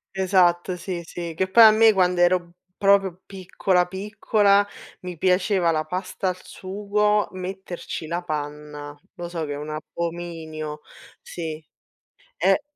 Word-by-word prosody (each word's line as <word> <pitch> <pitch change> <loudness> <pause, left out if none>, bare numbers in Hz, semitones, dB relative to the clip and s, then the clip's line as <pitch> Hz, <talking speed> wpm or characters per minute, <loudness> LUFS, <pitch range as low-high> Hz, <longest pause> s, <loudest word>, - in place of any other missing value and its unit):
Esatto, 185 -1 +2
sì, 175 -1 -4
sì. 170 0 -6
Che 190 +2 0
poi 230 +4 +8
a 220 - +10
me, 220 0 +6
quando 180 -2 +2
ero 175 -1 +3 0.3
proprio 195 -2 +3
piccola, 185 -1 0
piccola, 200 +1 +2 0.4
mi 180 -2 -7
piaceva 180 0 +2
la 155 -1 0
pasta 185 +2 -3
al 180 - -3
sugo 210 +2 0
metterci 185 -3 -6
la 175 +2 -3
panna. 150 -1 -6 0.2
Lo 175 0 -6
so 165 -3 -3
che 145 - -4
è - - -4
un 150 +1 -6
abominio, 155 -1 -5 0.4
sì. 160 -2 -6 0.7
E - - +3
180 Hz, 135 wpm, -24 LUFS, 165-190 Hz, 0.7 s, a